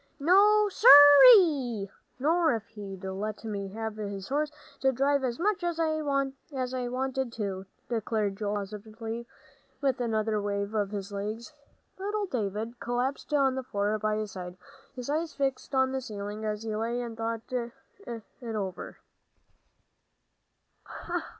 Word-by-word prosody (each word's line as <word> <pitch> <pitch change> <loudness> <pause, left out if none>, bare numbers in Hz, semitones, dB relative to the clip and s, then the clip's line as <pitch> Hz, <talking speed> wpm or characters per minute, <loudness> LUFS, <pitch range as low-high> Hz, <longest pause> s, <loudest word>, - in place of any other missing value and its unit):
"No, 410 +7 +5
sir 420 +4 0 0.3
ree! 290 - +6 0.3
Nor 320 +1 +2
if 220 -1 -5
he'd 195 -3 -9
let 195 +3 -4
me 205 -3 -4
have 220 +2 -5
his 200 -2 -5
horse 295 +2 0 0.3
to 265 - +3
drive 275 +2 +1
as 245 -2 -1
much 395 0 0
as 345 -1 -2
I 315 -1 +1 0.9
wanted 265 0 -2
to," 195 -3 -4 0.2
declared 220 -3 -1
Joel, 210 0 -2
most 200 0 -4
positively, 225 +2 -7 0.5
with 265 -3 0
another 220 -2 0
wave 200 0 -2
of 205 -2 0
his 200 -1 -5
legs. 215 +7 -5 0.5
Little 410 +2 -2
David 225 - -3
collapsed 250 +5 -2
on 275 -3 +3
the 265 - -3
floor 210 -3 -1
by 215 0 0
his 215 -1 -3
side, 180 -1 -8 0.4
his 250 -2 -6
eyes 310 +2 -2
fixed 275 0 -2
on 265 0 +3
the 265 0 -2
ceiling, 210 -2 -6
as 210 0 -3
he 220 -1 -3
lay 230 +3 -2
and 235 -2 -5
thought 225 0 -3
it 240 - -6 0.2
over. 210 -6 -5
230 Hz, 145 wpm, -28 LUFS, 210-270 Hz, 0.9 s, ree